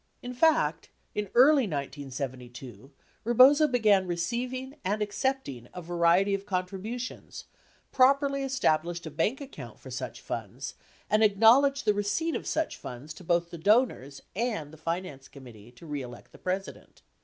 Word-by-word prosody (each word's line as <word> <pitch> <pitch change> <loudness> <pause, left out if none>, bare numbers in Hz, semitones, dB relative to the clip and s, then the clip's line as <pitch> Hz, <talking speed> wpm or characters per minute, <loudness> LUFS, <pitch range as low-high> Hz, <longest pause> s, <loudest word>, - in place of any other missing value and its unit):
In 250 0 -5
fact, 320 +5 +2 0.2
in 210 -2 -3
early 270 0 +6
1972, 135 - -6 0.3
Rebozo 260 +6 +6
began 215 -7 +3
receiving 250 - -3
and 205 +3 -1
accepting 205 - -2
a 180 - -5
variety 175 +3 +3
of 195 +1 -3
contributions, 195 +6 -5 0.5
properly 275 +1 +3
established 175 -11 0
a 160 - -6
bank 185 - 0
account 275 -1 -10
for - - -11
such - - -5
funds, - - -6 0.3
and 215 +1 +3
acknowledged 230 +7 +5
the 210 - +4
receipt 205 +12 -1
of - - -4
such 320 0 -1
funds 130 +6 -8
to 180 - -13
both 170 0 0
the 170 - -8
donors 200 - +1
and 210 -10 -2
the - - -9
Finance 160 -4 -4
Committee 120 -5 -14
To 125 - -15
Re 145 -3 -4
Elect 125 -1 -11
the - - -16
President. 190 +2 -5
195 Hz, 145 wpm, -28 LUFS, 155-250 Hz, 0.5 s, early